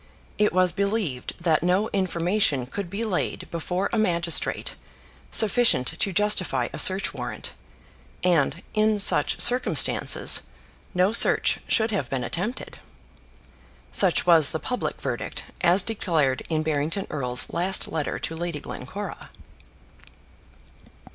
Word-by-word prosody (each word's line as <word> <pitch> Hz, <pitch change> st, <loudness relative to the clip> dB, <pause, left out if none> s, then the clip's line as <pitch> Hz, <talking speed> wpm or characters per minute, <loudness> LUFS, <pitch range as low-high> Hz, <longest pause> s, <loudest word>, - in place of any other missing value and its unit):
It 210 Hz, -, +3 dB
was 185 Hz, 0 st, +2 dB
believed 200 Hz, -, -2 dB
that 165 Hz, -3 st, +1 dB
no 180 Hz, +5 st, +1 dB
information 175 Hz, -6 st, 0 dB
could 185 Hz, +8 st, -6 dB
be 200 Hz, +5 st, -4 dB
laid 195 Hz, -5 st, -3 dB
before 180 Hz, +3 st, -2 dB
a 230 Hz, -, +1 dB
magistrate 175 Hz, -5 st, -1 dB, 0.6 s
sufficient 220 Hz, -, +3 dB
to 195 Hz, -, -2 dB
justify 185 Hz, -10 st, +1 dB
a -, -, -5 dB
search 190 Hz, +1 st, +3 dB
warrant; -, -, -5 dB, 0.7 s
and, 170 Hz, -6 st, +1 dB
in 215 Hz, 0 st, +2 dB
such 200 Hz, -, +2 dB
circumstances, 250 Hz, +1 st, +3 dB, 0.5 s
no 185 Hz, +4 st, +2 dB
search -, -, +4 dB
should 220 Hz, -1 st, +1 dB
have 165 Hz, -, -2 dB
been 130 Hz, -2 st, -2 dB
attempted. 210 Hz, -, -5 dB, 1.1 s
Such 185 Hz, -4 st, +2 dB
was 165 Hz, -5 st, +6 dB
the 160 Hz, -, -3 dB
public 250 Hz, +8 st, -4 dB
verdict, -, -, -4 dB, 0.2 s
as 180 Hz, +2 st, +5 dB
declared 160 Hz, -, -1 dB
in 155 Hz, -1 st, -1 dB
Barrington 155 Hz, +5 st, -2 dB
Erle's 125 Hz, -4 st, 0 dB
last 185 Hz, +3 st, +2 dB
letter 155 Hz, -3 st, -3 dB
to 165 Hz, -, -5 dB
Lady 170 Hz, -2 st, -4 dB
Glencora. 200 Hz, +13 st, -8 dB
180 Hz, 120 wpm, -24 LUFS, 160-205 Hz, 1.1 s, was